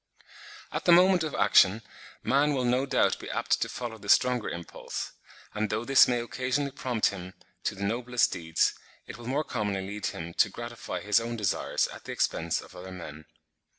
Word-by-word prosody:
At -, -, -4 dB
the 175 Hz, -, +6 dB
moment 180 Hz, +1 st, +6 dB
of 155 Hz, -, -3 dB
action, 100 Hz, +4 st, +5 dB, 0.4 s
man 145 Hz, +2 st, +2 dB
will 130 Hz, -, 0 dB
no 125 Hz, +3 st, +1 dB
doubt 130 Hz, -, +2 dB
be -, -, -8 dB
apt -, -, 0 dB
to -, -, 0 dB
follow 120 Hz, -3 st, -6 dB
the 100 Hz, 0 st, -10 dB
stronger 125 Hz, -1 st, +3 dB
impulse; 85 Hz, 0 st, -6 dB, 0.4 s
and 105 Hz, 0 st, -1 dB
though 110 Hz, +3 st, -2 dB
this 135 Hz, +1 st, +7 dB
may 120 Hz, -1 st, +1 dB
occasionally 130 Hz, +4 st, -2 dB
prompt 125 Hz, -5 st, 0 dB
him 95 Hz, -2 st, -8 dB, 0.3 s
to -, -, 0 dB
the 100 Hz, -, -6 dB
noblest 120 Hz, +4 st, +1 dB
deeds, 80 Hz, -3 st, +1 dB, 0.3 s
it -, -, -9 dB
will 120 Hz, -, -9 dB
more 140 Hz, +4 st, 0 dB
commonly 105 Hz, -8 st, -2 dB
lead 105 Hz, +1 st, -4 dB
him 85 Hz, +1 st, -6 dB
to -, -, +3 dB
gratify 120 Hz, 0 st, -6 dB
his 105 Hz, 0 st, +3 dB
own 115 Hz, +1 st, -4 dB
desires 105 Hz, -5 st, 0 dB
at -, -, -11 dB
the -, -, -5 dB
expense 85 Hz, 0 st, 0 dB
of -, -, -15 dB
other 90 Hz, +1 st, -9 dB
men. 80 Hz, -4 st, -9 dB
115 Hz, 190 wpm, -28 LUFS, 95-125 Hz, 0.4 s, this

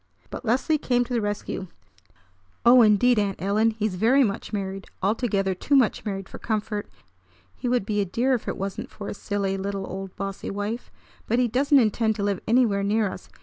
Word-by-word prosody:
But -, -, -6 dB
Leslie 260 Hz, +7 st, +1 dB
came 245 Hz, -2 st, +1 dB
to 245 Hz, +1 st, -6 dB
the 235 Hz, -, +1 dB
rescue. 205 Hz, -2 st, -3 dB, 1.0 s
"Oh, 245 Hz, +1 st, +8 dB
indeed, 220 Hz, +2 st, +5 dB
Aunt 200 Hz, -2 st, -1 dB
Ellen, 205 Hz, +5 st, +2 dB
he's 215 Hz, -2 st, -2 dB
very 235 Hz, +9 st, +4 dB
much 200 Hz, -3 st, -2 dB
married! 195 Hz, -2 st, -4 dB, 0.2 s
Altogether 200 Hz, -2 st, +1 dB
too 280 Hz, +10 st, 0 dB
much 255 Hz, -5 st, +2 dB
married 195 Hz, -2 st, -4 dB
for -, -, -10 dB
comfort. 215 Hz, -1 st, -3 dB, 0.7 s
He 250 Hz, -, -3 dB
would 245 Hz, -5 st, +1 dB
be 210 Hz, -1 st, 0 dB
a -, -, 0 dB
dear 240 Hz, +8 st, +1 dB
if 245 Hz, -, -2 dB
it -, -, -2 dB
wasn't 195 Hz, 0 st, -4 dB
for 200 Hz, -, -7 dB
his -, -, -6 dB
silly 200 Hz, -1 st, -2 dB
little 195 Hz, 0 st, -3 dB
old 190 Hz, 0 st, -7 dB
bossy 195 Hz, -1 st, -5 dB
wife! 205 Hz, +4 st, -4 dB, 0.4 s
But 235 Hz, -, +1 dB
he 250 Hz, -1 st, +3 dB
doesn't 275 Hz, +5 st, +3 dB
intend 220 Hz, -2 st, +2 dB
to 205 Hz, -, -3 dB
live 200 Hz, -2 st, 0 dB
anywhere 225 Hz, -4 st, +3 dB
near 205 Hz, +1 st, +1 dB
us. 185 Hz, -, -10 dB
210 Hz, 195 wpm, -25 LUFS, 195-240 Hz, 1.0 s, Oh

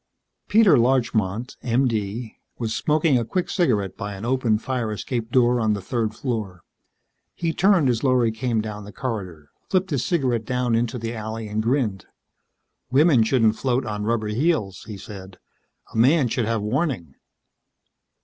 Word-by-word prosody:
Peter 210 Hz, -, +5 dB
Larchmont, 120 Hz, -3 st, 0 dB
M.D., 115 Hz, -3 st, -1 dB, 0.2 s
was 115 Hz, -2 st, -2 dB
smoking 150 Hz, -2 st, +2 dB
a -, -, -1 dB
quick 180 Hz, +10 st, -2 dB
cigarette 105 Hz, -, +1 dB
by 105 Hz, -2 st, -5 dB
an 95 Hz, +3 st, -7 dB
open 120 Hz, -3 st, +2 dB
fire 120 Hz, -1 st, -3 dB
escape 115 Hz, +2 st, -3 dB
door 125 Hz, -1 st, +3 dB
on 110 Hz, -1 st, +2 dB
the 100 Hz, -, -2 dB
third 110 Hz, +2 st, -2 dB
floor. 110 Hz, -9 st, -4 dB, 0.7 s
He 165 Hz, -1 st, -1 dB
turned 190 Hz, -6 st, +4 dB
as 120 Hz, -1 st, 0 dB
Lorry 125 Hz, -4 st, +3 dB
came 115 Hz, 0 st, -1 dB
down 105 Hz, -1 st, -6 dB
the 105 Hz, -, -10 dB
corridor, 95 Hz, -, -5 dB, 0.2 s
flipped 185 Hz, -1 st, +1 dB
his 135 Hz, -5 st, 0 dB
cigarette 125 Hz, -9 st, 0 dB
down 125 Hz, 0 st, 0 dB
into 115 Hz, +1 st, 0 dB
the 115 Hz, 0 st, -4 dB
alley 110 Hz, 0 st, -5 dB
and 105 Hz, +1 st, -1 dB
grinned. 115 Hz, -5 st, -1 dB, 0.8 s
"Women 135 Hz, 0 st, +5 dB
shouldn't 110 Hz, -1 st, +3 dB
float 130 Hz, -1 st, 0 dB
on 105 Hz, -2 st, -3 dB
rubber 110 Hz, -1 st, 0 dB
heels," 110 Hz, -, 0 dB
he 105 Hz, -3 st, -7 dB
said. 95 Hz, -2 st, -10 dB, 0.6 s
"A -, -, -5 dB
man 130 Hz, +3 st, +4 dB
should 115 Hz, 0 st, 0 dB
have 115 Hz, -1 st, -1 dB
warning." 110 Hz, -, -1 dB
115 Hz, 160 wpm, -23 LUFS, 105-130 Hz, 0.8 s, Peter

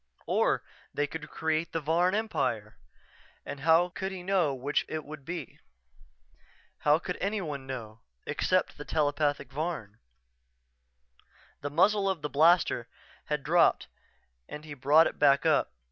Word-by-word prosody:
Or -, -, +1 dB, 0.3 s
they 145 Hz, -, 0 dB
could 150 Hz, +1 st, -7 dB
create 160 Hz, +1 st, -2 dB
the 165 Hz, -, 0 dB
Varn 170 Hz, +5 st, +2 dB
Empire... 115 Hz, -, -2 dB, 0.7 s
and 145 Hz, -, -6 dB
how 165 Hz, +4 st, +4 dB
could 190 Hz, +2 st, -4 dB
he 185 Hz, -2 st, -7 dB
know 180 Hz, -5 st, +2 dB
which 135 Hz, +2 st, -1 dB
it 155 Hz, -1 st, -4 dB
would 150 Hz, -1 st, -9 dB
be? 175 Hz, +2 st, -6 dB, 1.2 s
How 150 Hz, +1 st, +4 dB
could 180 Hz, +2 st, -5 dB
anyone 170 Hz, -10 st, -3 dB
know 115 Hz, -4 st, -7 dB, 0.3 s
except -, -, 0 dB
the -, -, -5 dB
telepathic 145 Hz, -2 st, 0 dB
Varn? 135 Hz, -, -4 dB, 1.6 s
The 145 Hz, -, -3 dB
muzzle 195 Hz, +6 st, +3 dB
of 175 Hz, -6 st, -3 dB
the 150 Hz, -, -3 dB
blaster 160 Hz, -5 st, +3 dB, 0.4 s
had 150 Hz, -2 st, -2 dB
dropped 170 Hz, +3 st, +3 dB, 0.6 s
and 150 Hz, +1 st, -8 dB
he 150 Hz, -, -8 dB
brought 145 Hz, +4 st, +5 dB
it -, -, -3 dB
back 140 Hz, +1 st, +4 dB
up. 155 Hz, -, +3 dB
155 Hz, 140 wpm, -29 LUFS, 145-175 Hz, 1.6 s, brought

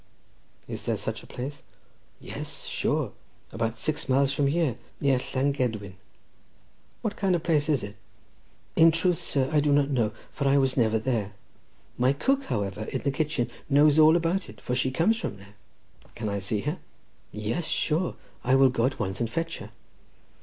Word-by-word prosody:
"Is -, -, -5 dB
there -, -, +1 dB
such -, -, -3 dB
a -, -, -15 dB
place?" 135 Hz, +2 st, -6 dB, 0.6 s
"Yes, -, -, -7 dB
sure; -, -, 0 dB, 0.4 s
about 115 Hz, 0 st, -2 dB
six 150 Hz, +4 st, -2 dB
miles 135 Hz, +1 st, +3 dB
from 140 Hz, 0 st, +1 dB
here, 145 Hz, -5 st, +1 dB, 0.2 s
near 135 Hz, -3 st, +3 dB
Llangedwin." 125 Hz, -7 st, -1 dB, 1.1 s
"What 215 Hz, -2 st, -1 dB
kind 190 Hz, -3 st, +2 dB
of 165 Hz, -, -2 dB
place 155 Hz, -3 st, +2 dB
is 140 Hz, -7 st, +2 dB
it?" 100 Hz, +1 st, -7 dB, 0.8 s
"In 165 Hz, +1 st, +7 dB
truth, 165 Hz, +1 st, +1 dB
sir, 135 Hz, -2 st, 0 dB
I 150 Hz, -, +5 dB
do 145 Hz, 0 st, +2 dB
not 145 Hz, 0 st, +3 dB
know, 115 Hz, -6 st, +1 dB, 0.2 s
for 140 Hz, -, -1 dB
I 140 Hz, +1 st, +5 dB
was 135 Hz, -1 st, +2 dB
never 110 Hz, -3 st, +3 dB
there. 110 Hz, -3 st, -1 dB, 0.7 s
My 125 Hz, +2 st, +4 dB
cook, 270 Hz, -, +1 dB
however, 105 Hz, -2 st, -2 dB
in -, -, -3 dB
the 140 Hz, -, +1 dB
kitchen, 140 Hz, -4 st, -1 dB, 0.2 s
knows 145 Hz, +2 st, +5 dB
all 155 Hz, +1 st, +7 dB
about 175 Hz, +3 st, 0 dB
it, -, -, -12 dB
for 125 Hz, -, -3 dB
she 130 Hz, +1 st, +1 dB
comes 170 Hz, +12 st, +2 dB
from 105 Hz, -, -4 dB
there." 100 Hz, +1 st, -15 dB, 0.6 s
"Can 110 Hz, -2 st, -3 dB
I 100 Hz, 0 st, -1 dB
see 100 Hz, +2 st, -1 dB
her?" 150 Hz, +5 st, -3 dB, 0.5 s
"Yes, 110 Hz, +11 st, -2 dB
sure; 165 Hz, +3 st, 0 dB, 0.3 s
I 130 Hz, +1 st, +3 dB
will 135 Hz, 0 st, +6 dB
go 125 Hz, -1 st, +2 dB
at 130 Hz, -, -4 dB
once 95 Hz, 0 st, -3 dB
and 115 Hz, -2 st, 0 dB
fetch 165 Hz, +7 st, -3 dB
her." 100 Hz, -, -9 dB
135 Hz, 180 wpm, -27 LUFS, 115-155 Hz, 1.1 s, In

